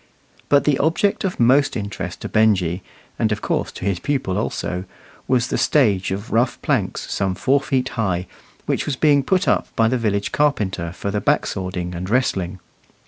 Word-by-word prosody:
But 145 -1 +5
the 145 -3 +2
object 165 +7 +1
of 190 -2 -2
most 130 +4 +4
interest 100 -2 -5
to - - -4
Benjy, 95 -5 +2 0.4
and 110 - +1
of 105 - -2
course - - -1
to - - -7
his 100 -4 0
pupil 135 - -1
also, 95 -3 -2 0.4
was 125 -2 +2
the - - -1
stage 105 -11 +2
of 100 +5 -4
rough 120 +2 +1
planks - - -1
some 95 -2 0
four 140 +7 +2
feet 130 -2 0
high, 95 -6 -1 0.4
which - - -1
was 145 - 0
being 145 +1 +4
put 185 +6 +1
up - - +2
by 115 - +3
the 125 +2 +1
village 100 -3 -1
carpenter 100 - 0
for 100 +2 -4
the 105 0 -1
back - - +2
swording 90 -1 -4
and 90 +2 -5
wrestling. 95 -7 0
110 Hz, 185 wpm, -21 LUFS, 95-135 Hz, 0.4 s, But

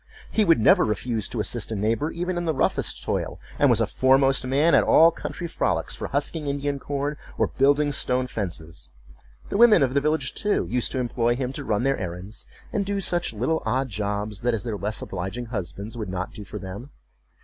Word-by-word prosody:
He 220 - +3
would 165 - +4
never 110 - +5
refuse 110 0 -2
to - - -4
assist - - -3
a - - -1
neighbor 115 +9 0
even 175 +2 -3
in 175 0 -2
the 160 -2 0
roughest - - 0
toil, - - -2 0.2
and - - +5
was - - +4
a - - +3
foremost 135 0 +3
man 145 +6 +3
at - - +6
all 165 +1 +6
country 175 - -6
frolics - - -1
for - - -5
husking 145 +2 -2
Indian 140 0 -1
corn, 145 +2 -3 0.2
or - - +3
building 145 +2 +2
stone 125 -2 +1
fences; 85 - -5 0.6
the - - -1
women 225 -8 +7
of 130 -1 +1
the 140 - +3
village, 150 -2 0
too, 205 0 0
used 125 -1 0
to 130 - -1
employ 120 -1 +1
him 130 0 -3
to 140 - -4
run 110 -3 0
their 135 +1 +1
errands, 95 +3 -6 0.3
and 200 -2 0
to 200 - -1
do 200 - 0
such 175 -2 0
little 125 +9 -1
odd 130 +1 0
jobs 105 0 -3
as 120 -3 +1
their 115 -3 -3
less 105 +2 -2
obliging 95 +6 -4
husbands 100 +3 -4
would 110 -4 -5
not 95 +1 -4
do 105 - -8
for 105 - -8
them. 100 +7 -8
125 Hz, 210 wpm, -25 LUFS, 105-145 Hz, 0.6 s, women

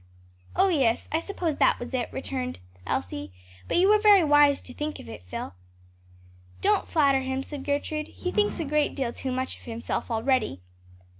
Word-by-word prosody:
"Oh, 385 +1 +4
yes; 265 -10 +2
I 320 - +2
suppose 335 -4 -3
that - - +3
was 245 +2 -7
it!" 250 -2 -1
returned 260 -1 -4 0.3
Elsie. 95 +2 -3 0.4
"But - - +1
you 365 +2 +5
were 425 +1 +6
very 415 -4 +7
wise 290 -2 +5
to 250 - -10
think 300 +3 -4
of - - -11
it, 110 -3 -9
Phil." 90 - -5 1.1
"Don't - - +2
flatter 280 -4 +3
him," 265 0 -2
said 285 -1 -7
Gertrude; 300 +2 -2
"he 360 - -5
thinks 415 -2 +1
a 325 - -1
great 300 +1 +1
deal 255 -4 -2
too 260 - -4
much 260 +1 -3
of - - -18
himself, 235 +1 -4
already." 225 - 0
275 Hz, 180 wpm, -26 LUFS, 245-310 Hz, 1.1 s, very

